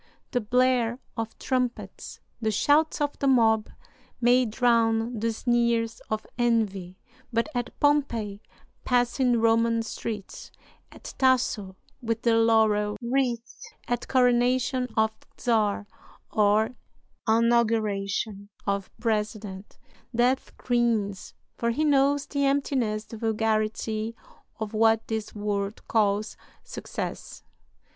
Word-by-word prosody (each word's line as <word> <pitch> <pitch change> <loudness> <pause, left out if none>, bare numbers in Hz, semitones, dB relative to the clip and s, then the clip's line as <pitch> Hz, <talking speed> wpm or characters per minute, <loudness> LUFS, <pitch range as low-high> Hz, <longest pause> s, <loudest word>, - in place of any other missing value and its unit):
The 245 - 0
blare 245 +1 +2 0.2
of 225 -1 -4
trumpets, 250 -2 -3 0.2
the 220 - +1
shouts 290 +9 +2
of 290 0 -1
the 280 - +1
mob, 225 -4 +3 0.5
may 245 +1 +4
drown 230 0 +2
the 230 +1 0
sneers 235 -1 0
of 215 0 -2
envy; 200 -6 0 0.3
but 230 +2 +1
at 245 -1 -4
Pompey 235 -9 +1 0.4
passing 245 0 +2
Roman 230 0 +3
streets, 220 -2 -6 0.4
at - - -10
Tasso 245 -7 +2 0.3
with 230 -1 -2
the 230 -1 +4
laurel 220 -2 +3
wreath, 240 -1 -2 0.3
at 240 -1 -2
coronation 250 0 +2
of 220 0 +3 0.3
czar 215 -4 +1 0.5
or 210 +1 +3 0.6
inauguration 220 -3 +1 0.2
of 200 -1 -1
president, 210 -3 -3 0.4
Death 250 +3 +1
grins, 230 -5 -1 0.2
for 235 - 0
he 300 +7 0
knows 280 0 +3
the 280 -1 -2
emptiness, 265 -6 0
the 225 - -9
vulgarity, 220 0 -1 0.4
of 220 -1 -4
what 225 0 +3
this 220 -1 -4
world 205 0 -3
calls 210 -1 +1 0.3
success. - - -6
230 Hz, 105 wpm, -26 LUFS, 215-245 Hz, 0.6 s, may